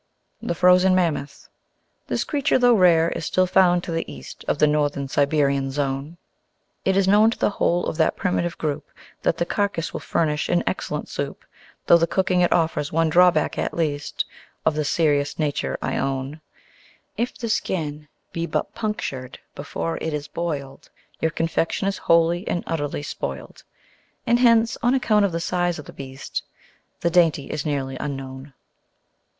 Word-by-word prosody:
The 170 - -2
Frozen 180 +1 +5
Mammoth 155 -6 -1 0.6
This - - -1
Creature, 290 -1 +1
though 245 -1 +5
rare, 170 -5 +4
is - - -4
still 185 - +2
found 180 -1 +4
to - - -5
the 165 0 -3
East - - -10
Of - - +1
the 150 - +5
Northern 145 -2 0
Siberian 140 -1 +1
Zone. 140 +3 -3 0.7
It 190 0 +2
is 195 -1 +3
known 210 +3 +6
to 230 - -4
the - - +1
whole 175 -3 +1
of - - -3
that 160 - +2
primitive 175 -2 -1
group 150 -1 -3 0.3
That 165 - +1
the 170 - 0
carcass 200 -3 -1
will - - -3
furnish 150 -2 -1
an 175 - +2
excellent - - -3
soup, - - -5 0.4
Though 170 - +6
the 165 - +2
cooking 180 +1 +1
it 175 - +3
offers 160 -3 +1
one 165 0 +2
drawback 175 -3 +4
at - - -2
least 150 -3 -1 0.4
(Of 160 - +2
a 155 - 0
serious 145 -1 +1
nature 150 -3 -1
I - - -1
own): 135 +3 -3 0.7
If 240 +2 -2
the 235 - -4
skin 150 -8 -2 0.3
be 170 0 -2
but - - -2
punctured 140 - -4 0.2
before 165 +3 -4
it 160 - -3
is 145 -1 -5
boiled, 145 -4 -5 0.3
Your 160 - +1
confection 165 +3 -1
is 195 - -2
wholly 170 +3 +2
and 175 - -1
utterly 145 -3 -3
spoiled. - - -6 0.6
And 240 0 +3
hence 230 -2 +4
(on 245 +3 +3
account 215 -5 +3
of 195 - -1
the 165 - -2
size 175 0 0
of 150 - -9
the - - -11
beast) 135 -1 -6 0.6
The 170 - +1
dainty 165 -5 +2
is 155 0 -3
nearly 135 -3 -2
unknown. 135 -1 -6
165 Hz, 170 wpm, -23 LUFS, 145-180 Hz, 0.7 s, known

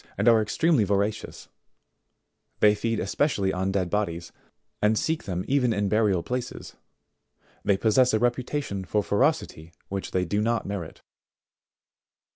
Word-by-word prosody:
and 105 +4 0
are 115 -2 +6
extremely 145 +4 +2
voracious; 100 +1 -2 1.1
they 105 -1 +6
feed 115 +1 -2
especially 100 -2 0
on 95 +1 -1
dead 95 -2 0
bodies, 85 -5 -2 0.5
and 105 +1 +3
seek 160 +6 -1
them 90 -3 -3
even 130 -3 +2
in 100 -1 0
burial 105 -5 +2
places; 125 0 -5 0.9
they 100 - +2
possess 120 +5 +3
a 110 - +2
reputation 120 -3 -1
for 105 +3 0
ferocity 100 - 0 0.2
which 100 0 -4
they 90 -1 0
do 105 +4 -1
not 115 +2 0
merit. 95 -5 -6
105 Hz, 135 wpm, -26 LUFS, 95-120 Hz, 1.1 s, are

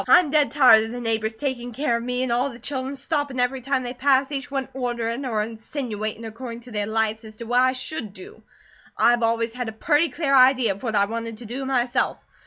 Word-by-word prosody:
I'm 340 -4 +6
dead 300 -1 +3
tired 250 -6 +6
of - - -6
the 245 - -5
neighbours 225 -1 -1
taking 245 -2 -4
care 260 -1 0
of - - -5
me, 250 +1 -1
and 255 - -1
all 245 +3 +2
of 275 - -7
the - - -10
children 265 +1 -4
stoppin' 285 -1 -2
every 250 +1 0
time 270 0 -1
they 245 0 -4
pass, 270 +1 +2
each 275 -1 -4
one 270 -2 -2
orderin' 240 0 -2
or 215 -3 0
insinuatin' 225 -1 -5
according 230 +1 -7
to 245 +1 -14
their 210 -1 -2
lights, 220 0 0
as 215 -1 -12
to 235 - -7
what 245 +2 +1
I 255 0 +3
should 255 -3 -5
do. 385 - -12 0.6
I've 240 0 +4
always 230 0 0
had 245 -2 -4
a - - -8
purty 300 +8 +2
clear 290 -5 -1
idea 255 -4 +6
of 195 - -7
what 225 -4 -2
I 200 0 +4
wanted 230 +1 -5
to 240 - -10
do 255 +5 -5
myself. 250 -2 0
245 Hz, 235 wpm, -23 LUFS, 225-270 Hz, 0.6 s, I'm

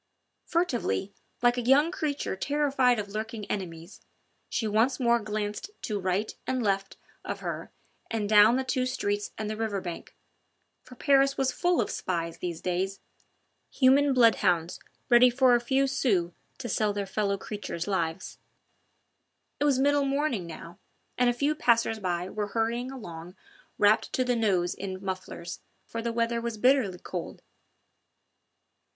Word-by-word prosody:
Furtively, 240 - -1 0.3
like 240 +1 +4
a - - 0
young 275 +7 +4
creature 290 - -2
terrified 270 +1 +2
of 205 -1 -4
lurking 215 +1 -5
enemies, 170 -2 -6 0.5
she 230 -4 -1
once 225 +6 +2
more 235 -2 +3
glanced 210 - -4
to 210 -2 -2
right 190 +3 -1
and 255 -1 0
left 195 -1 -1 0.3
of - - -5
her - - -5 0.4
and 220 -2 -1
down 210 +2 +7
the 265 - 0
two 255 0 0
streets 205 -4 -2
and 215 - -3
the 215 - -3
river 215 -2 -2
bank, 175 -3 -7 0.7
for 250 - -14
Paris 275 +1 +3
was 265 -1 +1
full 350 +4 +1
of 225 - 0
spies 170 -2 -3
these 170 -2 -4
days 185 +2 -2 0.7
human 275 +2 +4
bloodhounds 195 -9 +3 0.3
ready 245 0 +7
for 255 0 +4
a 240 - +5
few 265 +3 +2
sous 200 -10 +1 0.3
to 260 - -6
sell 215 -1 +1
their 200 -1 -2
fellow 200 0 -1
creatures' 195 -4 -5
lives. 170 -2 -2 1.2
It 290 - +1
was 280 -3 +3
middle 285 +1 +3
morning 275 - -1
now, 165 +1 -10 0.4
and 245 0 +3
a - - +4
few 280 +5 0
passers 230 -5 +2
by 180 -2 -2
were 210 +1 -3
hurrying 235 +3 0
along 180 -9 -9 0.4
wrapped 210 +1 +3
to 255 - +2
the 250 -1 +1
nose 190 -6 +1
in 190 -1 -5
mufflers, 185 -2 -5 0.3
for 230 - -5
the 235 0 -2
weather 235 0 0
was 230 -2 -4
bitterly 245 -5 +3
cold. 180 -1 -7
220 Hz, 155 wpm, -28 LUFS, 195-255 Hz, 1.2 s, down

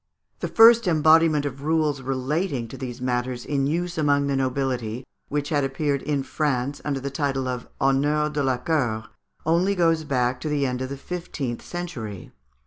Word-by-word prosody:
The - - -2
first 230 -1 +7
embodiment 155 -2 +4
of 135 -1 -5
rules 155 -2 +1
relating 135 +1 -1
to - - -8
these 125 -2 -6
matters 125 0 -2
in 140 -2 0
use 170 +2 -2
among 145 -2 +3
the 140 -1 0
nobility, 130 -3 -1 0.2
which 145 0 -2
had 145 -3 +1
appeared 140 +1 -1
in 145 -2 -1
France 140 -2 -1
under 140 -2 -1
the 140 +1 -4
title 135 -2 -1
of 125 -2 -4
"Honneurs 145 +3 +2
de 145 - 0
la 130 -2 +1
Cour," 120 -9 -1 0.4
only 175 +5 +2
goes 165 -3 +2
back 125 -3 0
to 155 - -3
the 145 -2 +1
end 125 -1 -2
of 130 - -3
the 140 - -5
fifteenth 140 -6 -5
century. 130 - -6
140 Hz, 175 wpm, -24 LUFS, 130-155 Hz, 0.4 s, first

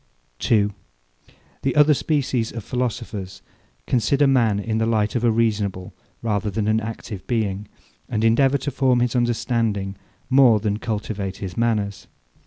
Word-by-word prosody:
2. 105 -2 +2 0.9
The 135 - -1
other 150 0 +6
species 135 -6 0
of 115 -2 -6
philosophers 115 -6 -4 0.4
consider 140 +4 +2
man 120 -7 +3
in 110 +2 -1
the 110 - +1
light 110 -2 +1
of 120 - 0
a 120 - +4
reasonable 105 -4 0 0.3
rather 105 -2 0
than 105 +1 -2
an 110 +1 +3
active 110 -3 -7
being, 105 -4 -1 0.4
and 110 - -1
endeavour 135 +5 +4
to 140 +2 -4
form 130 -2 +2
his 120 0 0
understanding 115 -4 0 0.3
more 130 -5 +5
than 105 0 -1
cultivate 105 -3 -3
his 95 -3 -6
manners. 105 -4 -1
115 Hz, 145 wpm, -22 LUFS, 105-125 Hz, 0.9 s, other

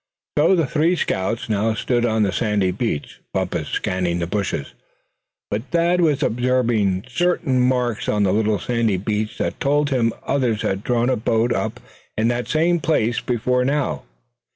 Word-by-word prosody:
So 160 +6 +4
the 165 -3 +2
three 160 +6 +1
scouts 110 - -1
now 110 +1 0
stood 120 +1 0
on 110 -1 +2
the 100 - +1
sandy 105 -3 +1
beach. 95 -6 -3
Bumpus - - -1
scanned 90 -2 -1
the 85 - -1
bushes, 100 +2 -3 0.8
but 105 - 0
Thad 170 +1 +2
was 150 -5 +2
observing 115 -6 +1
certain 140 -2 +1
marks 125 -3 0
on 105 -1 +2
the 95 -1 +2
little 110 0 +2
sandy 115 0 0
beach 105 +3 -2
that - - -2
told 145 +1 +1
him 120 -3 +2
others 125 -6 0
had 95 +1 -1
drawn 120 +1 +1
a - - +2
boat 115 +1 +1
up - - -2 0.4
in 110 +2 +2
that 120 0 -2
same 170 +2 +2
place 120 -7 +1
before 125 +1 0
now. 135 - 0
120 Hz, 165 wpm, -21 LUFS, 105-135 Hz, 0.8 s, So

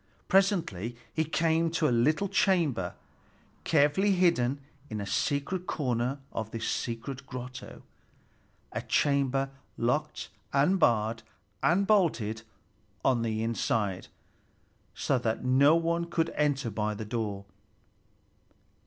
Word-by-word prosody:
Presently 165 - +1 0.2
he 160 - +1
came 165 +1 +1
to 160 -1 +1
a - - +1
little 155 +11 +2
chamber, 165 - +1 0.7
carefully 160 +7 +3
hidden 145 -8 +2 0.3
in 110 - -4
a 100 - -3
secret 145 - -1
corner 125 -1 -1
of 110 -1 -4
this 115 0 -4
secret 130 +4 -4
grotto, 125 -1 -8 0.9
a - - -3
chamber 135 -1 +1 0.3
locked 120 +1 -1 0.2
and 150 +8 +3
barred 115 -5 +2 0.4
and 190 +4 +3
bolted 145 - +2 0.6
on 125 -3 +3
the 110 -1 -1
inside, 110 -4 -1 0.9
so 130 - +1
that 115 0 -2
no 140 +5 +5
one 170 0 0
could 165 -1 -1
enter 145 -5 0
by 105 +1 -1
the 110 - -6
door. 105 -3 -3
135 Hz, 115 wpm, -29 LUFS, 115-165 Hz, 0.9 s, no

